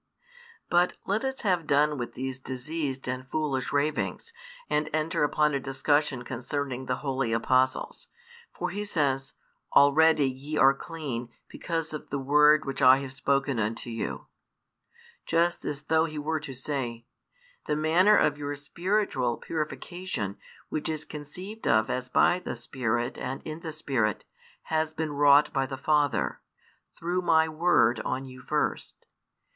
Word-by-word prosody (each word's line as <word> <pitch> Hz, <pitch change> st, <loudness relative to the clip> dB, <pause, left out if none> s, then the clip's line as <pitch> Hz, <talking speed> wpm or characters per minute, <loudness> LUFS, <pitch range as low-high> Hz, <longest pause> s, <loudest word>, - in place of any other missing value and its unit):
But 175 Hz, +1 st, +2 dB
let 205 Hz, +5 st, 0 dB
us 265 Hz, 0 st, -3 dB
have 180 Hz, -6 st, +1 dB
done 150 Hz, +1 st, +3 dB
with 120 Hz, -, -5 dB
these 130 Hz, 0 st, -4 dB
diseased 135 Hz, +1 st, -4 dB
and 130 Hz, +1 st, -4 dB
foolish 140 Hz, -4 st, -1 dB
ravings, 150 Hz, -, -1 dB, 0.3 s
and 150 Hz, +1 st, 0 dB
enter 155 Hz, 0 st, 0 dB
upon 150 Hz, 0 st, +2 dB
a 140 Hz, -, +1 dB
discussion 135 Hz, 0 st, 0 dB
concerning 130 Hz, +1 st, -4 dB
the 125 Hz, -, 0 dB
Holy 135 Hz, -3 st, 0 dB
Apostles. 130 Hz, +3 st, +1 dB, 0.4 s
For -, -, -4 dB
He 205 Hz, +2 st, -3 dB
says: 140 Hz, -8 st, -1 dB, 0.4 s
Already 150 Hz, +1 st, +6 dB
ye 135 Hz, +4 st, -4 dB
are 135 Hz, -1 st, +6 dB
clean, 135 Hz, -6 st, -5 dB, 0.2 s
because 165 Hz, -2 st, -3 dB
of 150 Hz, -, -7 dB
the 140 Hz, -, -2 dB
word 150 Hz, +3 st, +5 dB
which 135 Hz, -1 st, -4 dB
I 130 Hz, +1 st, +8 dB
have 135 Hz, -1 st, -6 dB
spoken 135 Hz, -1 st, 0 dB
unto 115 Hz, +2 st, -2 dB
you: 115 Hz, -, -4 dB, 1.0 s
just 170 Hz, +1 st, +1 dB
as 150 Hz, 0 st, -4 dB
though 160 Hz, +1 st, +3 dB
He 155 Hz, -2 st, -6 dB
were 155 Hz, +2 st, -1 dB
to 140 Hz, -3 st, -8 dB
say, 125 Hz, -3 st, -4 dB, 0.6 s
the 150 Hz, -, +1 dB
manner 170 Hz, +7 st, +4 dB
of 145 Hz, 0 st, +2 dB
your 145 Hz, 0 st, -3 dB
spiritual 145 Hz, -, -1 dB
purification, 155 Hz, -, -4 dB, 0.3 s
which 155 Hz, -, -3 dB
is 155 Hz, -1 st, -3 dB
conceived 180 Hz, +10 st, -8 dB
of 110 Hz, -1 st, +3 dB
as 125 Hz, 0 st, -3 dB
by 175 Hz, +7 st, +4 dB
the 180 Hz, -, -5 dB
Spirit 120 Hz, 0 st, -2 dB
and 130 Hz, +2 st, -4 dB
in 155 Hz, +1 st, -6 dB
the 165 Hz, -2 st, -6 dB
Spirit, 130 Hz, -9 st, -1 dB, 0.4 s
has 160 Hz, 0 st, -1 dB
been 160 Hz, -2 st, -2 dB
wrought 145 Hz, +1 st, +5 dB
by 135 Hz, -1 st, +1 dB
the 135 Hz, 0 st, -5 dB
Father, 145 Hz, -2 st, +1 dB, 0.6 s
through 175 Hz, +2 st, -1 dB
My 160 Hz, -2 st, +4 dB
Word 160 Hz, -7 st, +3 dB
on 130 Hz, +4 st, -3 dB
you 130 Hz, -1 st, -11 dB
first. 150 Hz, +3 st, -2 dB
145 Hz, 150 wpm, -28 LUFS, 130-160 Hz, 1.0 s, I